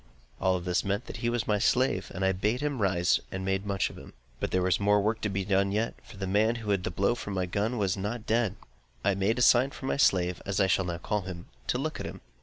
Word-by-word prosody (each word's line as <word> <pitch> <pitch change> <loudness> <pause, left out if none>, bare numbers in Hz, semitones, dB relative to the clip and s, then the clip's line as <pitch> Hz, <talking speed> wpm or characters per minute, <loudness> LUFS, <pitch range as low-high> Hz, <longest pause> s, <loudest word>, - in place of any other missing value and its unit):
All 95 -1 +2
this 90 0 0
meant 100 +4 -1
that - - -7
he 120 - -1
was 120 -2 -1
my 105 -1 +2
slave; 125 -4 +1
and 95 +1 0
I 95 - +4
bade 105 +7 0
him 145 -5 -1
rise, 90 -3 +3
and 95 0 -4
made 95 +1 -1
much 100 -1 0
of - - -11
him. - - -13 0.3
But - - -1
there 90 0 +1
was 90 -2 +2
more 105 0 +4
work 110 +2 0
to 105 - 0
be 95 -1 -2
done 100 0 +2
yet; 110 +3 0
for 105 - -13
the 95 - -3
man 105 +4 +2
who 110 -3 -3
had 100 - +3
had 90 - -7
the - - 0
blow 100 +5 +1
from 105 -4 -5
my 95 -1 0
gun 105 +7 -1
was 100 -4 +1
not 105 +4 -4
dead. 110 -3 +1 0.5
I 100 - +3
made 100 +5 +1
a 125 - +3
sign 125 +3 +6
for 135 - -9
my - - 0
slave 90 -9 +2
(as 100 0 -2
I 95 - +5
shall 95 0 +2
now 85 -1 -3
call 105 +4 -1
him) 90 -2 -8 0.2
to - - +1
look - - -3
at - - -4
him. - - -9
100 Hz, 280 wpm, -29 LUFS, 95-110 Hz, 0.5 s, sign